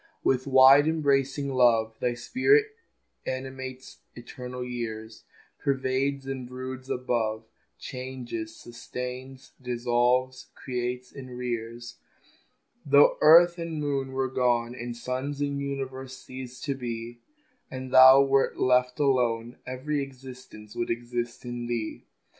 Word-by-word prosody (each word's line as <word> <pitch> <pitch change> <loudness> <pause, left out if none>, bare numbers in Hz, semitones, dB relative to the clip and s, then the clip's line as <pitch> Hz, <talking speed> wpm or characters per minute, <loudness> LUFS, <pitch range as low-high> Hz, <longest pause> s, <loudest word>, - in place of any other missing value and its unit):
With 130 +1 +1
wide 135 +2 +7
embracing 140 -3 +1
love 115 -3 +3
Thy 120 -1 0
spirit 405 - +3 0.6
animates 130 0 -6 0.2
eternal 125 +1 -7
years, 110 -2 -6 0.3
Pervades 135 0 -1
and 135 -2 -5
broods 130 +1 -7
above, 115 -3 -1 0.3
Changes, 125 -4 -6
sustains, 125 +2 -8
dissolves, 125 +1 0
creates, 125 0 -4
and 130 -3 -9
rears. 120 -1 -5 0.9
Though 140 0 +5
earth 170 +3 +7
and 165 -1 -4
man 140 -2 -2
were 135 0 0
gone, 120 -2 +1
And 120 -1 -6
suns 130 +4 -4
and 140 -1 -2
universes 135 -1 -5
ceased 130 -1 -9
to 140 - -1
be, 120 -2 -6 0.5
And 130 0 -7
Thou 130 +1 +9
were 135 0 +2
left 125 0 +2
alone, 120 -4 +1
Every 140 +3 -2
existence 130 -5 -10
would 120 - -2
exist 120 +1 -4
in 120 -1 -5
Thee. 115 -2 -4
130 Hz, 115 wpm, -27 LUFS, 120-135 Hz, 0.9 s, Thou